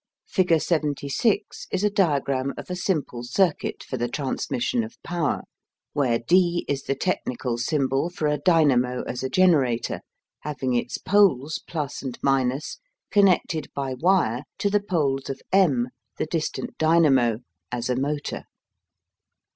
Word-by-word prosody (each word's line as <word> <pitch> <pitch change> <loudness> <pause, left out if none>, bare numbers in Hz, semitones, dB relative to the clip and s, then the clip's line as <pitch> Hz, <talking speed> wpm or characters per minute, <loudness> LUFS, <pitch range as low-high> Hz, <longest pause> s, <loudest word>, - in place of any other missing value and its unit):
Figure 180 -3 +3
76 155 - -1
is 190 +1 -1
a 210 - +4
diagram 140 -8 +1
of - - -7
a - - -1
simple 155 -10 -2
circuit 170 +7 0
for 130 - -5
the 120 0 -1
transmission 235 - -1
of 225 - -9
power, 170 -4 -1 0.5
where 130 -5 +2
D 175 +7 +2
is 140 -1 -1
the 135 - -2
technical 125 -8 -2
symbol 135 +3 0
for 175 -3 -4
a 150 -1 +1
dynamo 135 -7 +3
as 125 - -4
a 130 - -2
generator, 140 -9 +2 0.4
having 130 -4 -3
its 120 - -1
poles 170 -8 +2 0.3
(+ - - -7
and 130 -3 -6 0.7
) - - -56
connected 185 -5 +3
by 135 -2 -2
wire 130 - +2 0.2
to 200 - 0
the 205 0 +3
poles 145 -9 -1
of 135 - -4
M, 140 -11 +3 0.3
the - - -1
distant 155 0 -3
dynamo, 145 -8 +4 0.3
as 120 -1 -2
a 125 - +1
motor. 145 +3 -3
150 Hz, 140 wpm, -24 LUFS, 130-180 Hz, 0.7 s, a